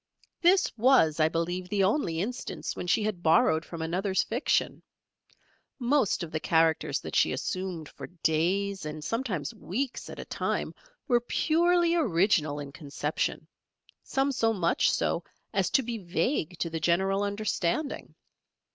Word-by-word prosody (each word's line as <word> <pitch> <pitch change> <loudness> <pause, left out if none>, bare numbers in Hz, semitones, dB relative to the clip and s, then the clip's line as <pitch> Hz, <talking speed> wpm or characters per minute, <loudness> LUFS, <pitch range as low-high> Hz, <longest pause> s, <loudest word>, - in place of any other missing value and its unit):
This 365 +2 +4
was, 215 - +4
I 155 0 +4
believe, 175 +3 -2
the 200 -1 +1
only 190 - +1
instance 245 +6 -4
when 180 - -5
she 210 - +2
had 210 -5 -2
borrowed 160 -1 +4
from 170 -1 -6
another's 190 +4 0
fiction. 240 +5 0 1.0
Most 245 -7 +1
of 165 - -7
the 155 - -2
characters 160 0 +2
that - - -6
she - - +4
assumed 185 -4 -3
for 135 -2 -9
days 185 +4 0
and 155 0 -6
sometimes 220 - -2
weeks 255 +7 -4
at - - -8
a - - -7
time - - -2 0.3
were 240 -3 +3
purely 340 +6 +2
original 175 - +2
in 140 -1 -7
conception; 150 0 -3 0.5
some 270 +1 0
so 225 -4 +1
much 175 -5 +2
so - - 0 0.3
as - - +1
to 270 - +3
be 230 -1 -4
vague 180 - -1
to 170 - -2
the 160 - -2
general 190 +4 +1
understanding. 205 - -2
185 Hz, 145 wpm, -28 LUFS, 165-235 Hz, 1.0 s, This